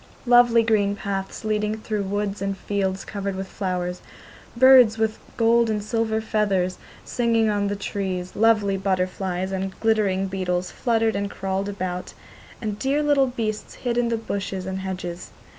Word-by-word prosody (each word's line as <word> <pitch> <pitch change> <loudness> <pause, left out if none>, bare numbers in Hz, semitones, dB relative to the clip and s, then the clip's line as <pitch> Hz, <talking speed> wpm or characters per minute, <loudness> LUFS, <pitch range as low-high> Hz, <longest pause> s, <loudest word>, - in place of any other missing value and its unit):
lovely 240 -1 +6
green 205 -3 +2
paths 200 +1 -4
leading 215 0 0
through 215 -1 -3
woods 200 0 -2
and 195 0 -2
fields 195 -1 -2
covered 200 -1 -4
with 190 0 -4
flowers, 180 -2 -3 0.6
birds 250 -3 +7
with 220 -1 0 0.2
gold 230 0 +4
and 210 -1 -1
silver 220 0 0
feathers 200 -5 0 0.3
singing 230 -2 +1
on 205 -1 0
the 205 - -1
trees, 190 -3 -4
lovely 210 -3 +3
butterflies 185 -1 -1
and 190 0 -4
glittering 210 -4 +2
beetles 185 -2 -2
fluttered 225 -2 +1
and 200 0 -1
crawled 195 0 -3
about, 185 -2 -4 0.5
and 210 -2 -4
dear 280 +3 +1
little 285 -2 +3
beasts 220 -4 -4
hid 240 -2 -2
in 240 -1 +1
the 230 - 0
bushes 200 -4 -4
and 190 0 -3
hedges. 180 -2 -5
205 Hz, 155 wpm, -24 LUFS, 190-225 Hz, 0.6 s, birds